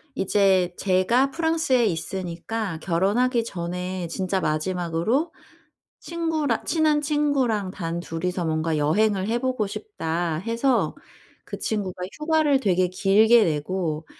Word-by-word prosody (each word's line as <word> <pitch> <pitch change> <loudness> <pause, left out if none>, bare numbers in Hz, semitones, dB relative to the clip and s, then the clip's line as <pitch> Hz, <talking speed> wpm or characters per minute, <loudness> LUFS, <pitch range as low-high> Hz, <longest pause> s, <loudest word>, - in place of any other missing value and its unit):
이제 190 -3 +2
제가 200 +8 +2
프랑스에 320 -6 +1
있으니까 185 +2 -3
"결혼하기 215 +9 +1
전에 180 -2 -4
진짜 190 +3 -2
마지막으로 175 - -1 0.7
친구라 320 -7 -1
친한 310 -2 +2
친구랑 280 -9 0
단 170 -3 -4
2 165 0 -6
이서 180 -1 -1
뭔가 160 0 0
여행을 190 +6 +1
해 235 +2 +1
보고 255 -4 -1
싶다." 170 - -3
해서 230 - 0 0.5
그 - - -7
친구가 195 -4 -3 0.2
휴가를 300 -3 +2
되게 185 -5 +2
길게 215 +5 +4
내고 160 0 -2
195 Hz, 260 characters per minute, -24 LUFS, 175-255 Hz, 0.7 s, 길게